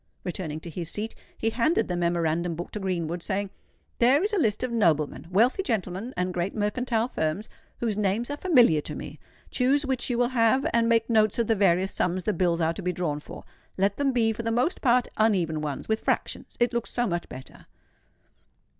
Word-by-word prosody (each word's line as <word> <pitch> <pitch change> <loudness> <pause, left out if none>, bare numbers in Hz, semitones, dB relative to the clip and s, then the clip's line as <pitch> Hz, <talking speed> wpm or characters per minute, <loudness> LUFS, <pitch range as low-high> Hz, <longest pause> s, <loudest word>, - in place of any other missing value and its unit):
Returning 170 -4 -4
to 170 - -8
his 165 0 -5
seat, 215 +4 -4 0.2
he 225 - 0
handed 255 +9 +1
the 180 - -2
memorandum 170 -1 0
book 175 +2 -6
to 210 - -5
Greenwood, 175 -3 -2
saying, 200 +1 -2 0.5
"There 260 +7 +5
is 420 +1 0
my 405 - +2
list 220 -8 +1
of 255 - -2
noblemen, 165 -10 +1
wealthy 230 - +3
gentlemen, 220 - -2
and 180 0 -1
great 175 +2 -2
mercantile 225 +2 0
firms, 165 -2 -2 0.3
whose 225 -3 -1
names 210 +5 0
are 290 - -3
familiar 245 - +4
to - - -6
me. - - -8 0.3
Choose 275 +3 +2
which 265 -2 -1
you 240 - 0
will 245 0 +2
have; 255 +1 +3
and 230 0 +3
make 230 -1 +3
notes 215 -3 +3
of 235 - +2
the 225 - +2
various 190 -2 +2
sums 180 +1 -1
the 215 - 0
bills 170 -1 +1
are 160 0 +2
to 180 - -7
be 180 0 -1
drawn 165 -5 -2
for. - - -10 0.3
Let 195 +1 +1
them 280 -1 +1
be 225 -3 +2
for 220 - -5
the 230 0 -2
most 250 +10 0
part 250 -2 +3
uneven 180 -8 +2
ones, 145 -3 -4
with 220 0 +1
fractions: - - -2
it 240 0 +2
looks 235 -1 -2
so 245 - 0
much 175 -4 -3
better." 130 - -11
210 Hz, 205 wpm, -26 LUFS, 175-240 Hz, 0.5 s, There